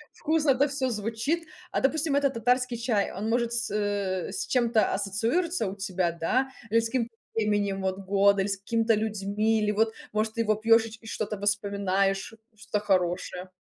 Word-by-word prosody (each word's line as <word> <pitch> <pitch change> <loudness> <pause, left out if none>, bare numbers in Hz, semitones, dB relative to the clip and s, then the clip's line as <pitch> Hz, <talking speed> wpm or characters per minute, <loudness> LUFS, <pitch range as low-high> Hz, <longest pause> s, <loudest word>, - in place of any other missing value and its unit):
Вкусно 310 -2 +1
это 275 +2 +3
всё 270 -2 -1
звучит. 230 +10 -2 0.2
А - - 0
допустим, 295 +1 +1
этот 280 -2 +2
татарский 250 +1 +1
чай, 230 -4 0
он, 205 +4 -4
может, 235 0 +1
с 235 0 -1
э, 200 -3 -1
с - - -3
чем-то 235 -3 +2
ассоциируется 225 - 0
у 190 - -5
тебя, 185 -3 -1
да? 245 +11 0 0.2
Или 230 +1 +4
с 225 - -2
каким-то 235 -1 -2 0.2
временем, 205 -3 0
вот, 190 0 -1
года, 200 +1 +4
или 195 - -2
с 195 -1 -2
какими-то 225 +3 +1
людьми, 215 +1 0
или 210 - +1
вот, 220 +2 +2 0.2
может, 215 +1 -1
ты 230 - +1
его 215 -1 +2
пьёшь 225 +1 +4
и - - -8
ч 220 - -11
и 225 - -15
что-то 215 -2 -4
вспоминаешь, 200 0 0 0.2
что-то 210 0 -3
хорошее? 180 -1 0
215 Hz, 185 wpm, -27 LUFS, 200-235 Hz, 0.2 s, Или